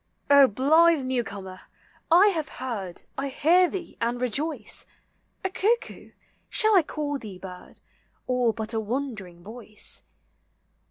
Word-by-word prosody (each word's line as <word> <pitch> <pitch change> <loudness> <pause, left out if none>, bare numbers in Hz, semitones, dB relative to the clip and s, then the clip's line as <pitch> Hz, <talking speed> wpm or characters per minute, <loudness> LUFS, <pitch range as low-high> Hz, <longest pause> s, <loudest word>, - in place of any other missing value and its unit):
O 280 -1 +8
blithe 310 +6 +4
new 255 -2 0
comer! 190 -3 -8 0.5
I 360 +5 +7
have 320 -6 -2
heard, 210 -9 -5 0.2
I 275 - -1
hear 340 +6 +4
thee 370 -3 -7
and 235 +1 0
rejoice. 270 +6 -2 0.6
A - - +2
cuckoo! 445 +5 -1 0.4
shall 435 -1 +4
I 370 - +7
call 295 -2 -4
thee 210 -6 -9
bird, 180 -1 -11 0.4
Or 250 -2 +2
but 220 0 -5
a 225 - 0
wandering 215 -7 -5
voice? 215 0 -10
255 Hz, 130 wpm, -26 LUFS, 215-320 Hz, 0.6 s, O